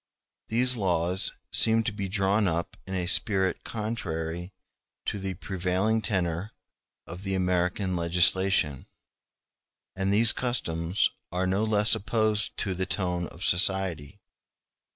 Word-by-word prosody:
These 125 +3 +2
laws 90 -2 0 0.2
seem 115 0 +4
to 110 - -1
be 100 -2 -4
drawn 100 +1 +1
up 85 0 -2
in 95 - -4
a 90 -1 -1
spirit 95 0 +2
contrary 90 -6 -4 0.5
to 100 - -2
the 95 -1 -4
prevailing 95 +4 -1
tenor 95 -1 -2 0.5
of 90 +2 -9
the 95 -1 -2
American 90 +1 0
legislation; 85 -3 +2 1.1
and 95 +1 0
these 110 +3 +4
customs 85 -8 0 0.2
are 90 +1 -1
no 95 +3 +1
less 105 0 +4
opposed 110 0 0
to 95 - -1
the 95 +1 -3
tone 90 -3 -1
of - - -10
society. 90 -2 +1
95 Hz, 125 wpm, -27 LUFS, 90-105 Hz, 1.1 s, seem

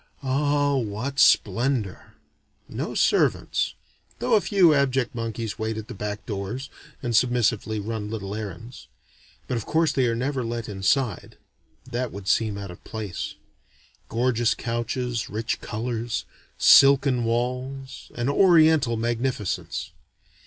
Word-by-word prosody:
Ah 145 +1 +1
what 125 +4 -3
splendor! 115 -1 +2 0.5
No - - -5
servants, - - +1 0.4
though - - -1
a 215 - +5
few 185 -6 +4
abject 135 -2 +1
monkeys 115 -2 -4
wait 110 0 -2
at 110 -1 -6
the - - -5
back 105 +1 -5
doors, 105 +6 -5 0.3
and 120 -1 -1
submissively 115 -3 +2
run 105 0 -4
little 100 -3 -5
errands. 110 +3 -7 0.6
But 125 - -1
of 115 - -5
course 160 -1 +2
they 130 -4 +1
are 115 - 0
never 130 +2 -1
let 115 0 -4
inside: 105 +5 -1 0.5
they 125 0 -2
would 100 -3 -9
seem 105 +1 +1
out 100 -2 -6
of 90 - -13
place. 105 -5 -5 0.7
Gorgeous 120 -1 +1
couches, 120 0 -3
rich 110 +3 -3
colors, 115 +1 -3 0.3
silken 135 -2 +6
walls, 125 +3 -3
an 120 +1 -2
oriental 155 -6 +4
magnificence. 115 -3 -2
120 Hz, 125 wpm, -25 LUFS, 110-135 Hz, 0.7 s, silken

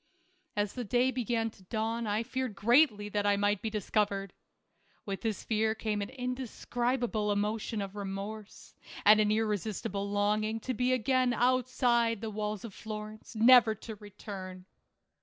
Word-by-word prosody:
As 205 -1 0
the 250 - -4
day 245 +4 +2
began 230 -3 -1
to 195 - -20
dawn, 225 +2 -2
I 210 +2 0
feared 255 -2 -3
greatly 225 -1 +4
that 205 0 0
I 200 0 +3
might 205 -1 +1
be 220 - -2
discovered. 205 -2 -1 0.7
With 195 -1 -4
this 220 -4 -2
fear 220 0 +1
came 215 -2 -2
an 200 - -4
indescribable 250 -3 -2
emotion 210 +1 -1
of 195 0 -8
remorse, 200 +1 -6 0.3
and 210 +1 +8
an 210 - +2
irresistible 210 -2 -1
longing 210 +2 +1
to 255 - -2
be 250 +2 +1
again 255 0 +2
outside 245 -2 +2
the 220 0 -4
walls 210 0 -3
of 220 - -8
Florence, 215 +2 -8
never 230 0 +7
to 220 +2 -8
return. 190 -3 -9
215 Hz, 150 wpm, -31 LUFS, 205-240 Hz, 0.7 s, and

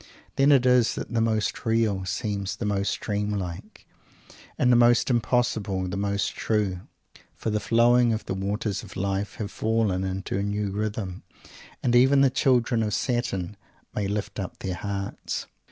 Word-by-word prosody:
Then 140 +2 +4
it 135 -3 +5
is 125 -2 +4
that - - -6
the 115 - +2
most 110 -2 0
real 110 -4 +1
seems 100 0 -2
the 110 - -4
most 100 -1 0
dream 105 0 -1
like, 90 -4 -6 0.7
and 125 - +3
the - - +6
most 120 +2 +4
impossible 110 -6 0
the 90 - -4
most 100 0 -1
true, 105 -5 0 0.6
for 110 - -3
the 105 - +1
flowing 120 +2 +4
of 110 0 -2
the - - -3
waters 100 +1 -2
of - - -12
Life 100 +1 -2
have 105 -1 -5
fallen 110 -4 0
into 95 0 -3
a - - 0
new 100 0 -2
rhythm, 100 -2 -3 0.6
and 120 -1 +2
even 135 +3 +6
the 135 -2 +5
children 125 -3 +2
of 105 -3 0
Saturn 105 -6 -2 0.4
may 100 -2 -1
lift 105 +1 -3
up 95 - -5
their 95 - -4
hearts! 100 +1 -4
105 Hz, 170 wpm, -26 LUFS, 100-120 Hz, 0.7 s, the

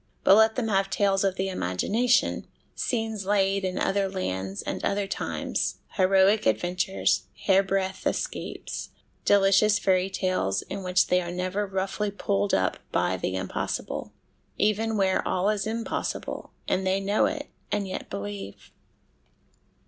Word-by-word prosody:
But - - +7
let 220 +1 +5
them 245 -3 -1
have 195 -1 +2
tales 195 +1 +2
of 195 -1 +1
the 190 0 -1
imagination, 205 - +1 0.3
scenes 225 -4 -2
laid 195 -1 +2
in 185 -1 -2
other 195 0 +1
lands 95 - -3
and - - -4
other 200 0 0
times, - - -2
heroic 195 - +3
adventures, 180 - +1 0.2
hairbreadth 195 0 +2
escapes, - - -4 0.4
delicious 200 +1 +5
fairy 185 0 +2
tales 185 - 0
in 195 - -6
which 180 0 +3
they 180 0 +2
are 175 - -5
never 185 +3 -2
roughly 195 +2 -2
pulled 100 - -1
up - - 0
by - - +1
the 95 - -2
impossible 95 0 -3 0.5
even 215 +1 +1
where 190 -1 +2
all 190 +3 +2
is 210 0 -2
impossible, 230 +1 -3 0.2
and 190 0 0
they 190 +1 +2
know 200 +2 +2
it, 295 -2 -5 0.2
and 205 -1 0
yet 185 - -5
believe. 100 -1 -7
195 Hz, 140 wpm, -26 LUFS, 185-205 Hz, 0.5 s, But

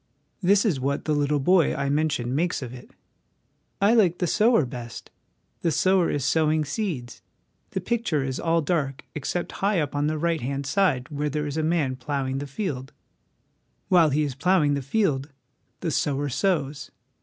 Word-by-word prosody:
This 200 +3 +4
is 170 -11 +1
what 140 +2 -2
the 155 - +1
little 145 0 +1
boy 175 +3 +3
I 140 - -1
mentioned 145 -4 0
makes 165 -1 0
of 125 -1 -7
it: 125 - -11 0.5
" - - -46
I - - +5
liked 190 -7 +4
the 180 - 0
Sower 215 - +3
best. 120 -1 -8 0.5
The 170 - +1
sower 185 +2 +3
is 140 -3 -1
sowing 155 0 +2
seeds; 150 - -4 0.5
the 190 - -3
picture 190 - 0
is 130 -1 -3
all 165 -1 +1
dark 140 -4 -1
except 165 +4 -3
high 200 -1 +2
up 145 -2 -2
on 145 +1 +1
the 155 0 -1
right 165 0 0
hand 140 +2 -3
side 145 -5 +1
where 150 0 -2
there 150 +1 -2
is 145 -1 -4
a 160 - 0
man 155 -5 0
ploughing 135 0 -2
the 145 - -5
field. 135 -4 -4 1.0
While 175 -5 +5
he 150 +2 +1
is 145 -3 -2
ploughing 150 0 +2
the 140 - -1
field 140 -2 0 0.5
the 165 - -1
sower 145 0 0
sows. 150 -3 -1
150 Hz, 180 wpm, -25 LUFS, 140-175 Hz, 1.0 s, I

